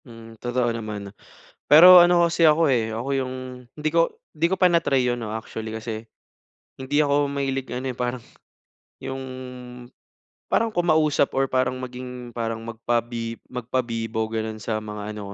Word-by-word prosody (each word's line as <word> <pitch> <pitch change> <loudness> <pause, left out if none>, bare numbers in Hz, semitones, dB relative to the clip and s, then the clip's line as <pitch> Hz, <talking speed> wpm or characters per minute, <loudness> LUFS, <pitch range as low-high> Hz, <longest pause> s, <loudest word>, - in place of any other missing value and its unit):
Hmm, 115 -2 -12
totoo 120 -1 0
naman. 105 -3 -6 0.5
Pero 180 +5 +10
ano 175 0 +5
kasi 170 -1 +3
ako 155 -1 +4
eh, 110 -3 0
ako 120 +4 -4
yung 130 -1 -3 0.4
hindi 155 0 -1
ko 165 +1 +2 0.2
hindi 160 +2 +1
ko 190 - 0
pa 180 -2 +4
na-try 140 -6 +2
'yon, 120 0 0
'no, 110 -2 -5
actually 110 0 -6
kasi, 110 0 -6 0.7
hindi 140 +3 0
ako 145 0 +2
mahilig 135 -1 -2
ano 130 +2 -3
eh, 125 - -6
parang 125 0 -2 0.8
yung, 135 0 -5 1.3
parang 225 -1 +1
kumausap 155 -6 +2
or 135 - +3
parang 130 -1 0
maging, 125 -1 -8
parang 115 -1 -3
magpa 115 +1 -1 0.5
magpabibo, 115 -2 -2
gano'n, 110 -1 -3
sa 110 +1 -2
mga 105 0 -6
ano 105 - -8
125 Hz, 155 wpm, -24 LUFS, 115-145 Hz, 1.3 s, Pero